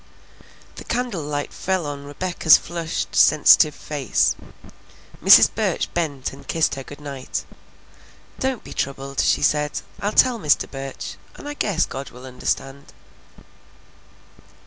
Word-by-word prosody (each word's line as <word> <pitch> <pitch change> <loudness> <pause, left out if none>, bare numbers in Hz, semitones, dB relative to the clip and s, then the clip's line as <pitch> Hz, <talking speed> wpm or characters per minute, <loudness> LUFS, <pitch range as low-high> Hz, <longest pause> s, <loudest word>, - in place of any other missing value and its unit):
The - - -8
candle 240 -7 -2
light 145 0 -4
fell 185 -3 -2
on 140 -1 -6
Rebecca's 160 +2 +3
flushed, 170 -1 -4
sensitive 150 0 +6
face. 145 -4 0 0.9
Mrs. - - +8
Burch - - -1
bent 145 -6 -2
and - - -14
kissed 160 -1 +1
her 135 - -5
good 145 +2 -11
night. 140 -3 -5 0.9
"Don't 265 -3 -2
be - - -10
troubled," 135 0 -4
she - - +2
said. 150 0 +1 0.2
"I'll 205 - -1
tell 245 +1 +4
Mr. 150 -6 +2
Burch, 135 -1 -7 0.2
and - - -10
I 290 - -4
guess 200 - 0
God 135 0 -7
will 125 +1 -13
understand." 135 +2 -4
150 Hz, 130 wpm, -22 LUFS, 140-175 Hz, 0.9 s, Mrs